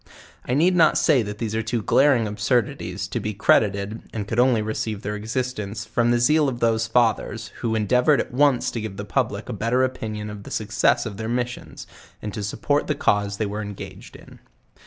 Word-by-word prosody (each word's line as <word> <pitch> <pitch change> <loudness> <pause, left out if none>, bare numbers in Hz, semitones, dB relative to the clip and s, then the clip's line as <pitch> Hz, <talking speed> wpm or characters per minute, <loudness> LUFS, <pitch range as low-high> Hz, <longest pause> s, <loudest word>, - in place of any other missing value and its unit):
I 125 - +1
need 175 +5 +3
not 165 -3 +5
say 145 -6 +4
that 105 -1 -5
these 110 -1 -3
are 110 - 0
two 115 0 -2
glaring 135 -3 +4
absurdities 115 -2 -1
to - - -2
be 105 -1 -4
credited, 100 +1 +2
and 105 -3 -4
could 115 +2 -1
only 125 -3 +4
receive 110 -1 -3
their 105 +1 -3
existence 110 -2 -4
from 120 0 +1
the 120 - +3
zeal 150 +4 +3
of 120 -2 -5
those 115 -1 +1
fathers, 115 -1 +1
who 115 -2 -1
endeavored 125 +6 +3
at - - -3
once 140 -1 +3
to 115 - -4
give 105 -3 -6
the - - -5
public - - -1
a - - -4
better 125 +3 +1
opinion 110 -5 -3
of 105 -1 -8
the - - -11
success 110 +2 +1
of 105 -3 -6
their 110 0 -4
missions, 120 0 -4 0.3
and 105 - -6
support 145 +8 0
to 150 - +1
the - - -18
cause 100 0 +1
they 110 - -1
were 105 +1 -4
engaged 105 -2 -9
in. - - -14
115 Hz, 205 wpm, -23 LUFS, 105-125 Hz, 0.3 s, not